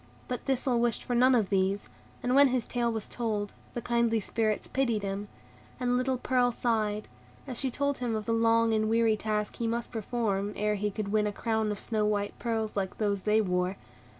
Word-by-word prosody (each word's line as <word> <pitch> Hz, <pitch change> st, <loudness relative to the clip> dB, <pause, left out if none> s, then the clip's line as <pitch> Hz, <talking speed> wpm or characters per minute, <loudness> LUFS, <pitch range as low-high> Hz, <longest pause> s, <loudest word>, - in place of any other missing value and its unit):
But 250 Hz, -, -4 dB
Thistle 260 Hz, -2 st, +1 dB
wished 235 Hz, -1 st, 0 dB
for 245 Hz, -, -3 dB
none 255 Hz, +2 st, +5 dB
of 220 Hz, -5 st, +2 dB
these, 195 Hz, +1 st, +1 dB, 0.4 s
and 245 Hz, -, +1 dB
when 280 Hz, +1 st, +7 dB
his 255 Hz, -3 st, 0 dB
tale 240 Hz, -1 st, 0 dB
was 220 Hz, -2 st, -4 dB
told, 215 Hz, -4 st, -2 dB, 0.2 s
the 240 Hz, -, -3 dB
kindly 235 Hz, -1 st, +2 dB
Spirits 215 Hz, +1 st, -1 dB
pitied 235 Hz, -6 st, 0 dB
him; 200 Hz, +1 st, -3 dB, 0.5 s
and 245 Hz, -1 st, +1 dB
little 255 Hz, +1 st, +1 dB
Pearl 245 Hz, 0 st, +2 dB
sighed, 215 Hz, -3 st, 0 dB, 0.4 s
as 255 Hz, -4 st, -4 dB
she 265 Hz, -, 0 dB
told 280 Hz, +2 st, -1 dB
him 240 Hz, -3 st, -1 dB
of 215 Hz, -1 st, -3 dB
the 230 Hz, -, 0 dB
long 230 Hz, 0 st, +3 dB
and 215 Hz, 0 st, +1 dB
weary 225 Hz, -1 st, +3 dB
task 210 Hz, -1 st, -2 dB
he 230 Hz, -, -1 dB
must 235 Hz, +1 st, -2 dB
perform, 210 Hz, -3 st, -1 dB
ere 210 Hz, 0 st, +1 dB
he 210 Hz, 0 st, -1 dB
could 200 Hz, 0 st, -4 dB
win 210 Hz, 0 st, +2 dB
a -, -, -1 dB
crown 220 Hz, 0 st, -1 dB
of 205 Hz, -, -4 dB
snow 215 Hz, -2 st, -1 dB
white 205 Hz, -1 st, 0 dB
pearls 225 Hz, -2 st, -2 dB
like 190 Hz, -2 st, -2 dB
those 200 Hz, -2 st, 0 dB
they 215 Hz, +2 st, +3 dB
wore. 180 Hz, -1 st, 0 dB
225 Hz, 205 wpm, -29 LUFS, 210-240 Hz, 0.5 s, when